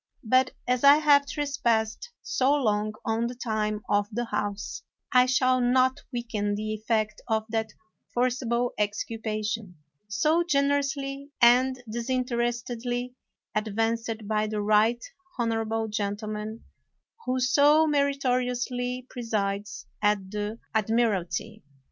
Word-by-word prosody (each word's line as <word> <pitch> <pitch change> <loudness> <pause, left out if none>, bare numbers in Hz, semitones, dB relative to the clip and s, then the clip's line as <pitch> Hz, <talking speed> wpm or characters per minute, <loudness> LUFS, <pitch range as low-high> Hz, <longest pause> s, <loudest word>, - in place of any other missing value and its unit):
But 255 +3 +3 0.2
as 250 +1 +1
I 280 +1 +9
have 290 -2 +4
trespassed 280 - -1
so 270 +3 +2
long 215 -5 0
on 225 0 0
the 245 - -6
time 215 -3 -2
of 205 0 +2
the 240 +3 -2
House 205 -2 -3 0.3
I 250 -1 +5
shall 255 0 +3
not 255 +2 +3
weaken 225 -4 -2
the 215 +1 -3
effect 215 -1 -1
of 220 -2 0
that 220 -1 -2 0.4
forcible 245 -1 0
exculpation 215 -1 -2 0.3
so 300 +12 +2
gener 285 -3 +2
ously 275 -1 -4
and 250 +2 +4
disinterestedly 240 0 -2 0.4
advanced 225 +1 -1
by 215 0 +1
the 210 -1 -2
right 215 +3 +3 0.3
honorable 225 -1 -1
gentleman 210 +1 -4 0.6
who 255 +1 +1
so 285 +4 +5
meritoriously 250 -3 0
pre 250 - -7
sides 205 -3 -2 0.2
at 205 -2 +1
the 210 +1 -3 0.2
admiralty. 220 -2 0
230 Hz, 115 wpm, -27 LUFS, 215-255 Hz, 0.6 s, I